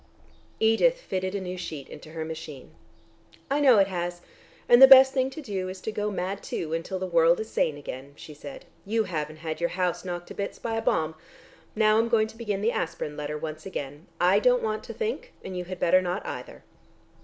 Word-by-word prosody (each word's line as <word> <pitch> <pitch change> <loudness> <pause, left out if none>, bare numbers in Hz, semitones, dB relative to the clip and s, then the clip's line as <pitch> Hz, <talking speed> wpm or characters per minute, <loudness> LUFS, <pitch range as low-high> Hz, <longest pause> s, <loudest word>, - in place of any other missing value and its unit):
Edith 225 - +3
fitted 185 - -3
a - - -1
new 185 -1 -5
sheet 155 -6 -6
into 155 +1 -12
her 160 -1 -4
machine. 155 - -8 0.8
"I 285 - +2
know 265 -6 +6
it 195 - +6
has, 175 -2 -4 0.5
and 240 +1 +7
the 265 - +12
best 265 0 +9
thing 260 -1 +1
to 300 +3 -9
do 190 -6 -3
is 185 0 -7
to 220 - -3
go 210 0 -2
mad 195 0 -3
too, 160 -1 -4
until 165 +3 -3
the 185 - -3
world 170 -1 +4
is 220 0 -5
sane 150 -2 0
again," 140 -1 -8
she 150 - -11
said. 145 -1 -10 0.2
"You 220 +2 0
haven't 155 -5 -4
had 155 -1 -3
your 170 - +1
house 180 -1 -1
knocked 175 -1 -5
to - - -7
bits 200 - -4
by 230 - -4
a 225 - 0
bomb. 160 -7 +1 0.6
Now 215 0 +4
I'm 230 +1 +1
going 225 -2 +3
to 220 - -14
begin 210 -4 -3
the 225 +3 +2
aspirin 165 -5 -3
letter 150 0 -4
once 155 +2 -6
again. 145 -3 -6
I 185 +3 +4
don't 250 +2 +3
want 215 0 -2
to - - -7
think 470 +2 -3
and 185 - -6
you 180 0 -4
had 185 0 -7
better 185 +2 +4
not, 180 -1 -3
either." - - -7
185 Hz, 220 wpm, -26 LUFS, 160-220 Hz, 0.8 s, the